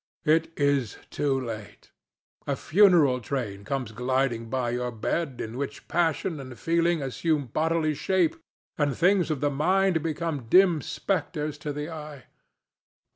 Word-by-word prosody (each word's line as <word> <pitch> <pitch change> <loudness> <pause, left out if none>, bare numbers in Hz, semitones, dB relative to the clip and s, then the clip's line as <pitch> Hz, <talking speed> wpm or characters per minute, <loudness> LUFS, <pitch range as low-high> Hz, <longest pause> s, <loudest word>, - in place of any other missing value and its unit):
It 160 +1 +3
is 140 -6 +1
too 140 -2 0
late. 110 -5 -8 0.6
A - - +1
funeral 170 -9 +4
train 105 -5 -4
comes 125 +1 -3
gliding 125 -1 -1
by 125 -2 -1
your 125 0 -2
bed 130 +4 -2
in 115 +2 -5
which 140 - -5
passion 165 -1 0
and 130 -3 -9
feeling 170 -1 +1
assume 145 +2 0
bodily 155 +4 0
shape 170 +2 +1 0.4
and 145 -3 +1
things 180 0 +3
of 150 -4 -2
the 145 0 +1
mind 180 +4 +2
become 155 -5 -3
dim 180 -3 +5
spectres 150 -3 -2
to 150 - -4
the 150 +3 -5
eye. 150 -4 -8
145 Hz, 140 wpm, -26 LUFS, 130-165 Hz, 0.6 s, dim